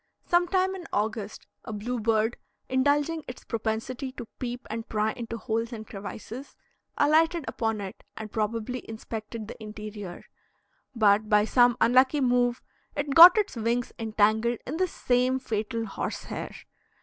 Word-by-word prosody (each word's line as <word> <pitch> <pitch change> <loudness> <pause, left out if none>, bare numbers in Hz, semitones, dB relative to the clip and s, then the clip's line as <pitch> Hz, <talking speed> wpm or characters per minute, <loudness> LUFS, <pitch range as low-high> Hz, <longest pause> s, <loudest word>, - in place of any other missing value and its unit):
Some 350 0 +3
time 375 +1 +1
in 365 -3 -8
August 215 0 -2 0.2
a - - -7
bluebird, 225 +1 0 0.3
indulging 290 +4 +1
its 250 - -8
propensity 230 +4 -3
to 240 - -7
peep 245 0 -5
and 225 +1 -5
pry 215 0 +1
into 230 -1 -6
holes 225 +1 -2
and 220 -2 -7
crevices, 220 +6 -8 0.4
alighted 320 +2 +3
upon 225 -3 -1
it 195 -1 -8
and 215 -1 -7
probably 225 +3 -2
inspected 220 0 -6
the 225 - -10
interior; 210 -3 -8 0.7
but 215 -1 +3
by 210 -1 +5
some 245 +1 +4
unlucky 255 +5 +4
move 245 -2 +2 0.3
it 285 -1 -1
got 345 +6 +11
its 415 -7 0
wings 235 +2 -1
entangled 220 +1 +2
in 295 +5 -4
this 370 -1 0
same 250 +1 +1
fatal 225 -2 -3
horse 200 - -4
hair. - - -6
230 Hz, 145 wpm, -27 LUFS, 220-260 Hz, 0.7 s, got